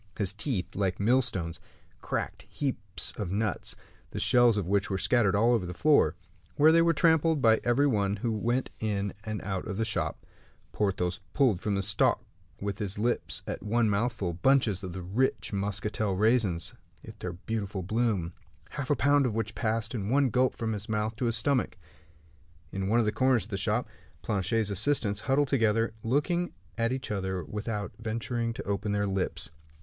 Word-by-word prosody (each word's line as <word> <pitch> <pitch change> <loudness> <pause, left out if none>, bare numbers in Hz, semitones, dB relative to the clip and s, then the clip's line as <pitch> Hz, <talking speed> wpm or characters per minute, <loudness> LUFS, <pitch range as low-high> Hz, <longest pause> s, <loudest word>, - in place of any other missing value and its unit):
His 100 -3 0
teeth, 105 -3 -2
like 95 -1 0
millstones, 105 -7 +1 0.4
cracked - - -4
heaps 115 -9 -3
of 100 -5 -3
nuts, 105 +2 -1 0.3
the - - -5
shells 120 -3 +4
of 100 - -1
which 100 +2 +1
were 95 - 0
scattered 105 0 +2
all 115 +4 +4
over 105 -7 0
the 90 - -6
floor, 150 +6 +4 0.4
where 155 +2 +6
they 165 +1 +5
were 170 0 +4
trampled 160 -1 +3
by 110 -3 +4
every 120 +4 +3
one 100 -7 +1
who 115 +3 -2
went 120 +4 -1
in 100 -2 -1
and 110 -2 -3
out 95 0 -3
of 100 -3 -4
the 115 - +1
shop; 90 -8 -2 0.5
Porthos 95 -4 -1 0.2
pulled 125 -10 +3
from 100 +1 -1
the 100 - 0
stalk 100 0 +2 0.4
with 100 -1 -3
his 100 -2 -2
lips, 120 +3 -1
at - - -4
one 110 0 +1
mouthful, 100 -4 -1
bunches 110 0 +2
of 90 -2 -5
the 95 0 -6
rich 110 +6 0
Muscatel 100 0 -1
raisins 105 -5 +1 0.3
with 110 -1 -11
their 90 -4 -4
beautiful 100 0 -4
bloom, 105 -4 0 0.4
half 140 -3 -5
a 145 - +4
pound 145 -1 +3
of 110 - -3
which 115 0 -2
passed 115 +1 -1
at 115 - -2
one 130 +6 +2
gulp 130 +3 +2
from 110 -1 -2
his 105 0 -6
mouth 110 +1 -1
to 120 - -1
his 115 -1 +2
stomach. 125 +1 +1 0.9
In 95 0 -2
one 110 +4 +3
of 120 - +3
the 105 - +2
corners 130 +1 +2
of 110 - -12
the - - -1
shop, 95 - 0 0.4
Planchet's 105 +1 0
assistants, 105 0 +1
huddled 135 +4 +1
together, 115 -3 +2
looked 140 +10 +1 0.4
at 115 +1 0
each 130 -3 -3
other 95 -3 -2
without 105 +3 -4
venturing 115 +1 -2
to - - -6
open 100 +1 -2
their 105 0 +1
lips. 95 -5 -2
110 Hz, 185 wpm, -29 LUFS, 100-120 Hz, 0.9 s, where